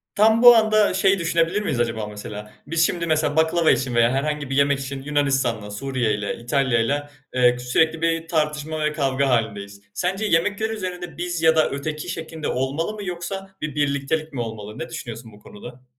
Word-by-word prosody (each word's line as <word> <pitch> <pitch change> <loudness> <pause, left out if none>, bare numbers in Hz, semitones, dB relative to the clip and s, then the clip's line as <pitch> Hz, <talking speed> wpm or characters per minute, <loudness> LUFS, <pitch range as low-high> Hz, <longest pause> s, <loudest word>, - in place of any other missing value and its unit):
Tam 220 +2 +4
bu 245 -1 +10
anda 215 -2 +3
şeyi 190 +1 +3
düşünebilir 170 +3 +1
miyiz 140 - -2
acaba 115 -3 -1
mesela? 105 0 -8
Biz 165 +2 +2
şimdi 170 0 -1
mesela 155 -2 +1
baklava 160 +1 +3
için 125 -2 0
veya 120 0 +4
herhangi 145 +1 -2
bir 135 - -2
yemek 140 0 +3
için 135 0 -6
Yunanistan'la, 135 -7 0
Suriye'yle, 110 -3 -2
İtalya'yla, 135 +3 0 0.2
eee, 125 -1 +4
k - - -9
sürekli 160 +6 +1
bir 165 0 0
tartışma 155 -1 -1
ve 150 - 0
kavga 140 -2 0
hâlindeyiz. 105 -4 -1
Sence 190 +4 -1
yemekler 205 +4 +1
üzerinde 180 -5 -5
biz 175 -1 -3
ya 160 0 +5
da 155 - +3
öteki 150 +4 -4
şeklinde 160 -2 -5
olmalı 140 +9 -1
mı 210 -1 -7
yoksa 190 +2 -6
bir 150 -2 -4
birliktelik 145 +2 -1
mi 125 - -3
olmalı? 110 -2 -7
Ne 160 - -5
düşünüyorsun 115 -1 -8
bu 105 - -16
konuda? 120 +5 -12
150 Hz, 180 wpm, -22 LUFS, 125-165 Hz, 0.2 s, bu